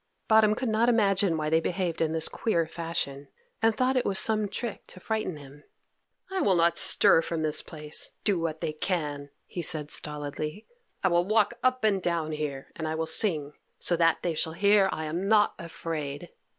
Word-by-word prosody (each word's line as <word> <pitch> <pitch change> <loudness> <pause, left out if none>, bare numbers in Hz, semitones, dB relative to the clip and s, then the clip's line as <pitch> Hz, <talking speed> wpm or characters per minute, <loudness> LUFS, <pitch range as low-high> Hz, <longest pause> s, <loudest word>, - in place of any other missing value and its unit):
Bottom 220 -1 +5
could 255 - -3
not 220 +2 +2
imagine 200 -6 +2
why 155 0 -2
they 160 - +4
behaved 170 0 -2
in 160 -1 +1
this 160 0 +1
queer 170 -7 0
fashion, 160 -4 -4 0.3
and 225 -1 +2
thought 255 +1 +1
it 255 - +2
was 195 - -1
some 215 0 +2
trick 235 +1 -5
to - - -12
frighten 215 -5 -3
him. 145 +1 -14 0.7
"I 380 -1 -1
will 190 - +3
not 170 0 +3
stir 165 - +4
from 165 -1 -3
this 155 -1 +3
place, 150 -2 -1
do 200 -5 +1
what 160 -1 -3
they 155 - -2
can," 150 -4 -3 0.2
he 175 - -6
said 155 -3 +2
stolidly. 150 +5 -2 0.4
"I 190 - +4
will 175 0 +2
walk 215 0 +2
up 255 -1 +1
and 200 -3 +2
down 170 -3 -1
here, 150 -3 -5
and 160 - -4
I 155 - -2
will 160 0 -2
sing, 160 -4 +1 0.2
so 175 - 0
that 165 -1 +2
they 175 - 0
shall 160 +1 -1
hear 200 +2 +4
I 155 - -4
am 170 +5 -3
not 210 -1 +4
afraid." 165 -2 -5
170 Hz, 195 wpm, -27 LUFS, 155-205 Hz, 0.7 s, Bottom